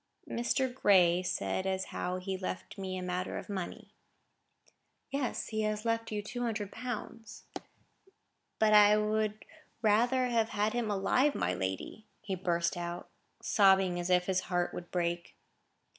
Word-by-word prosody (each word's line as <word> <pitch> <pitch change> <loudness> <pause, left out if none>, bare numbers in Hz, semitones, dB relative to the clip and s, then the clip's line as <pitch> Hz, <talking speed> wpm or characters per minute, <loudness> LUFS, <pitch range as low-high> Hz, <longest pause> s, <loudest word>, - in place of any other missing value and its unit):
"Mr. 245 +2 0
Gray 180 -7 +4
said 185 +1 -2
as 190 0 -1
how 180 +1 -2
he 185 +1 -5
had 190 0 -3
left 185 - -5
me 190 -1 -4
a 185 - -4
matter 180 0 -3
of - - -8
money." 190 -3 -6 1.2
"Yes, 275 -3 -2
he 220 -1 -1
has 215 +1 -1
left 230 0 -1
you 210 -1 -2
two 245 +4 -5
hundred 215 -4 -2
pounds." 230 -2 -7 1.1
"But 215 -1 +4
I 210 0 +7
would 215 0 -1 0.4
rather 240 +5 +3
have 230 -2 +1
had 210 0 0
him 240 -3 -1
alive, 250 +8 +2
my - - 0
lady," 95 - -4 0.2
he 200 -2 -3
burst 170 -1 0
out, 175 0 -5 0.3
sobbing 190 -3 +4
as 175 +1 -3
if 180 0 +3
his 185 0 +1
heart 175 -1 0
would 175 - -7
break. 170 -1 -2
205 Hz, 155 wpm, -31 LUFS, 180-220 Hz, 1.2 s, I